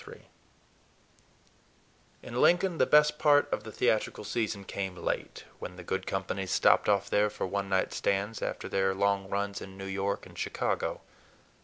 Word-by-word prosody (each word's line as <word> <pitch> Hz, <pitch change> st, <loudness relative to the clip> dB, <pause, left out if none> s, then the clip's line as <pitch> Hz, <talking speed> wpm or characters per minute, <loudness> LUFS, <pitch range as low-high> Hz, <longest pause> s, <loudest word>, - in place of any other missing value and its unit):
III -, -, -12 dB, 2.0 s
IN 120 Hz, +1 st, -3 dB
Lincoln 175 Hz, -1 st, +3 dB
the -, -, +4 dB
best 150 Hz, 0 st, +5 dB
part 145 Hz, -1 st, +5 dB
of -, -, -2 dB
the 110 Hz, -, -8 dB
theatrical 110 Hz, -2 st, 0 dB
season 105 Hz, -1 st, -2 dB
came 95 Hz, -1 st, -4 dB
late, 85 Hz, -, -3 dB, 0.2 s
when 90 Hz, -, -7 dB
the 90 Hz, -, -10 dB
good 95 Hz, +2 st, -3 dB
companies 95 Hz, 0 st, -3 dB
stopped 95 Hz, -, +4 dB
off 100 Hz, -1 st, +2 dB
there 105 Hz, +1 st, +2 dB
for 105 Hz, -, -4 dB
one 100 Hz, +1 st, -2 dB
night 95 Hz, -1 st, +1 dB
stands, 100 Hz, +3 st, -1 dB
after -, -, -3 dB
their 95 Hz, 0 st, +1 dB
long 100 Hz, 0 st, +1 dB
runs 100 Hz, 0 st, -2 dB
in 95 Hz, 0 st, -9 dB
New 95 Hz, -, -7 dB
York 100 Hz, +1 st, -2 dB
and -, -, -12 dB
Chicago. -, -, -2 dB
100 Hz, 165 wpm, -29 LUFS, 95-110 Hz, 2.0 s, best